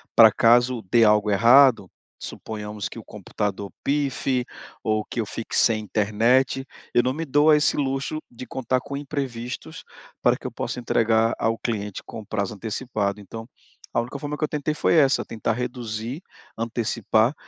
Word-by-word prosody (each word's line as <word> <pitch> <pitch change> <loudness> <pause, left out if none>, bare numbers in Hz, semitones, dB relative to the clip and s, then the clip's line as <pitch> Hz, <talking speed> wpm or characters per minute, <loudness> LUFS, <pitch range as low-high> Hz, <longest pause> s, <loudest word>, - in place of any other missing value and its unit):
para 110 -2 +9
caso 120 +1 +3
dê 120 -1 +6
algo 105 -1 +4
errado, 115 0 +6 0.3
suponhamos 105 -1 -6
que - - -9
o - - -10
computador 100 -1 -4
pife, 135 -3 0 0.4
ou 110 -1 0
que 115 - -3
eu - - -3
fique 110 +2 -6
sem 115 -2 +4
internet, 115 +6 +1 0.3
eu 120 - +5
não 130 +1 0
me 160 +4 -4
dou 145 +1 +3
a 150 - +8
esse 150 - +2
luxo 135 +2 -1
de 120 +1 -9
contar 130 0 -1
com 140 0 -6
imprevistos 135 -4 -5 0.4
para - - +4
que - - -15
eu - - -3
possa 125 - -4
entregar 115 -1 +2
ao 115 0 +1
cliente 105 -4 -4
com 110 - -8
prazo 100 0 -3
antecipado. 105 -2 -3
Então, 115 +3 -9 0.5
a - - +2
única 130 +4 -6
forma 150 +1 -4
que - - -4
eu 150 - +1
tentei 150 0 -2
foi 160 - +1
essa, 140 -4 +4
tentar 115 0 -2
reduzir, 120 - -4 0.4
antecipar 115 +1 +1
115 Hz, 170 wpm, -24 LUFS, 110-135 Hz, 0.5 s, para